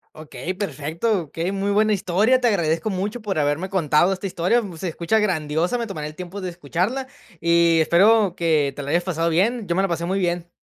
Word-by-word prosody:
Okey, 155 +2 -6
perfecto, 185 +2 -2
okey, 165 +5 -4
muy 200 +1 -2
buena 215 +1 +3
historia, 205 +7 +2
te 245 - +3
agradezco 170 -2 0
mucho 205 +4 -3
por 200 -5 -3
haberme 150 +5 0
contado 175 -1 +2
esta 190 +1 -7
historia, 185 +5 +1
mm, 190 -5 -8
se 180 - -4
escucha 170 +6 0
grandiosa, 170 +1 0
me 235 - -2
tomaré 155 -8 -5
el 155 - -10
tiempo 180 +3 -7
de 185 - -3
escucharla 180 - -2 0.3
y 170 0 +4
espero 195 +4 +4
que 155 -5 +1
te 145 - -6
la 140 - -6
hayas 175 +1 +2
pasado 170 -2 -1
bien, 205 +7 +1
yo 170 - 0
me 190 - +2
la - - +2
pasé 170 -1 -2
muy 190 +2 -1
bien. 175 -1 -2
180 Hz, 215 wpm, -22 LUFS, 165-200 Hz, 0.3 s, y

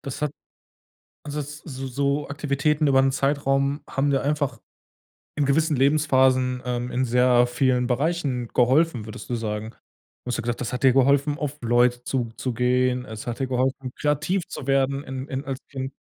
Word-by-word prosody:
das 140 +1 -6
hat 150 - +1 0.9
also 150 0 -4
s 150 +1 -6
so 135 -2 -6
so 140 +3 -1
Aktivitäten 145 +1 0
über 135 -2 +4
'n 135 0 +3
Zeitraum 140 +1 0
haben 140 +1 0
dir 135 - +2
einfach 145 -4 -1 0.8
in 145 - 0
gewissen 150 +2 +2
Lebensphasen, 130 -3 +3
ähm, 125 0 -2
in 130 +1 0
sehr 125 0 +4
vielen 125 0 +1
Bereichen 135 -2 -1
geholfen, 130 0 +3
würdest 110 -1 -9
du 125 - -2
sagen? 110 -1 -3 0.5
Du - - -8
hast 120 - -1
ja - - 0
gesagt, 120 +1 -3
das 120 +1 -4
hat 125 +2 -4
dir 130 -2 +6
geholfen, 140 +2 +3
auf 150 -2 -4
Leute 120 +1 +2
zuzugehen, 125 +1 0
es 110 -2 -8
hat 120 +1 -4
dir 135 - +1
geholfen, 130 +1 -1
kreativ 155 +5 0
zu 135 - -7
werden 135 0 +1
in 130 0 -6
in 135 +1 -4
als 135 -2 -4
Kind. 135 -1 -5
135 Hz, 175 wpm, -24 LUFS, 125-140 Hz, 0.9 s, dir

